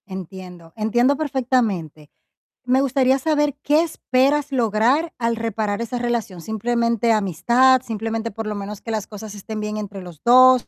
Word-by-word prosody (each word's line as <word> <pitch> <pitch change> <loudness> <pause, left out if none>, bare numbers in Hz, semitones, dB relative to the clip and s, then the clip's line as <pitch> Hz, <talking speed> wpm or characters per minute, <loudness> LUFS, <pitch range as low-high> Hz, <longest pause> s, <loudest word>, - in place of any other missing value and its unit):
Entiendo, 180 -3 -9
entiendo 240 +5 +2
perfectamente. 235 - -1 0.6
Me 255 +2 +3
gustaría 265 -1 +2
saber 295 -1 +1
qué 300 +2 +3
esperas 285 -2 0
lograr 245 +6 +1
al 230 -1 0
reparar 220 -2 -2
esa 235 +1 -3
relación, 235 -7 -2
¿simplemente 235 +2 0
amistad? 235 +6 +3
¿Simplemente 225 -1 -3
por 225 +2 -6
lo 210 - -3
menos 200 0 -6
que 230 - -6
las 215 -2 -3
cosas 215 0 -9
estén 215 +2 -6
bien 210 0 -4
entre 200 -2 -6
los 175 -4 -12
2? 255 +1 +6
230 Hz, 150 wpm, -21 LUFS, 205-255 Hz, 0.6 s, 2